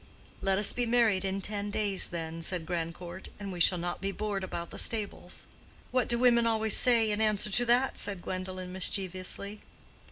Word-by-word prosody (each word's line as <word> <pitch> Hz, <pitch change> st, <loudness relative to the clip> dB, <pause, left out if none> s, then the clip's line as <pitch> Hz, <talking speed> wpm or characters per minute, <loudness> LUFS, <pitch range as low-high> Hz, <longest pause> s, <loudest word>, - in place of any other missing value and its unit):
"Let 195 Hz, -1 st, +1 dB
us 205 Hz, -, +5 dB
be 245 Hz, -1 st, -1 dB
married 225 Hz, -5 st, +3 dB
in 195 Hz, 0 st, -2 dB
ten 205 Hz, +1 st, -3 dB
days, 205 Hz, -2 st, +1 dB
then," 165 Hz, -1 st, -5 dB
said 170 Hz, 0 st, -3 dB
Grandcourt, 170 Hz, +2 st, -5 dB
"and 200 Hz, -1 st, -6 dB
we 180 Hz, -, -6 dB
shall 180 Hz, +2 st, +4 dB
not 175 Hz, +1 st, -4 dB
be 195 Hz, 0 st, -2 dB
bored 205 Hz, -1 st, -3 dB
about 170 Hz, -2 st, -5 dB
the -, -, -3 dB
stables." 215 Hz, -3 st, -2 dB, 0.5 s
"What 255 Hz, -2 st, +1 dB
do 235 Hz, -, +3 dB
women 235 Hz, -1 st, +4 dB
always 220 Hz, -1 st, +4 dB
say 230 Hz, -3 st, +5 dB
in 210 Hz, +1 st, -1 dB
answer 210 Hz, -1 st, +2 dB
to 245 Hz, +5 st, +2 dB
that?" 245 Hz, +3 st, +2 dB
said 195 Hz, -3 st, -3 dB
Gwendolen, 185 Hz, 0 st, -5 dB
mischievously. 190 Hz, +2 st, -2 dB
195 Hz, 185 wpm, -29 LUFS, 185-220 Hz, 0.5 s, us